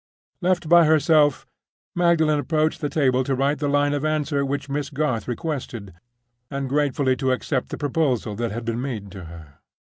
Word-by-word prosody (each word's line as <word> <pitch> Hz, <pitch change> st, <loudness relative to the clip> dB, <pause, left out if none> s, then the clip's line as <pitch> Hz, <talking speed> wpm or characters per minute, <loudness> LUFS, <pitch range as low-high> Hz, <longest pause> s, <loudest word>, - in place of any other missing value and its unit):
Left 180 Hz, -2 st, +1 dB
by 170 Hz, 0 st, +7 dB
herself, 155 Hz, -2 st, +3 dB, 0.5 s
Magdalen 160 Hz, -4 st, +3 dB
approached 155 Hz, +2 st, 0 dB
the 145 Hz, -, -1 dB
table 130 Hz, -4 st, +2 dB
to 135 Hz, 0 st, -1 dB
write 140 Hz, +2 st, 0 dB
the 145 Hz, -, -1 dB
line 145 Hz, 0 st, +2 dB
of 145 Hz, 0 st, -2 dB
answer 155 Hz, -2 st, 0 dB
which 140 Hz, +1 st, -3 dB
Miss 140 Hz, 0 st, -3 dB
Garth 145 Hz, -6 st, -2 dB
requested, 120 Hz, -, -5 dB, 0.6 s
and 140 Hz, -1 st, -3 dB
gratefully 140 Hz, -1 st, +1 dB
to 130 Hz, 0 st, 0 dB
accept 130 Hz, +1 st, -1 dB
the -, -, -5 dB
proposal 140 Hz, -7 st, 0 dB
that 120 Hz, 0 st, -1 dB
had 115 Hz, +2 st, -5 dB
been 115 Hz, +1 st, -2 dB
made 110 Hz, -7 st, -5 dB
to 95 Hz, -2 st, -9 dB
her. 80 Hz, -3 st, -13 dB
140 Hz, 175 wpm, -23 LUFS, 125-155 Hz, 0.6 s, by